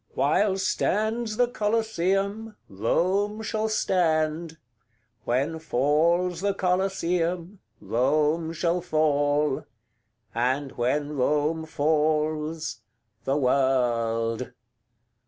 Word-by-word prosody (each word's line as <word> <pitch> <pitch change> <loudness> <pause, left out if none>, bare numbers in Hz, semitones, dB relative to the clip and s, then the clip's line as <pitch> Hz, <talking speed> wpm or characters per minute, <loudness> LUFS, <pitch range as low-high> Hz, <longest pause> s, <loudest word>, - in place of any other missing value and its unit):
CXLV. - - -32
'While 200 -2 +2
stands 215 +3 0
the 245 0 +4
Coliseum, 210 -1 -1
Rome 195 - 0
shall 220 0 -1
stand; 160 -5 0 0.7
When 140 +7 0
falls 165 +5 +1
the 200 0 0
Coliseum, 180 -1 -1 0.2
Rome 150 +6 +1
shall 170 +2 0
fall; 145 -3 +1 0.7
And 130 +4 0
when 145 +5 -1
Rome 150 +4 0
falls 155 -1 0 0.5
the 135 +2 +1
World.' 125 -3 +1
160 Hz, 80 wpm, -26 LUFS, 145-190 Hz, 0.7 s, the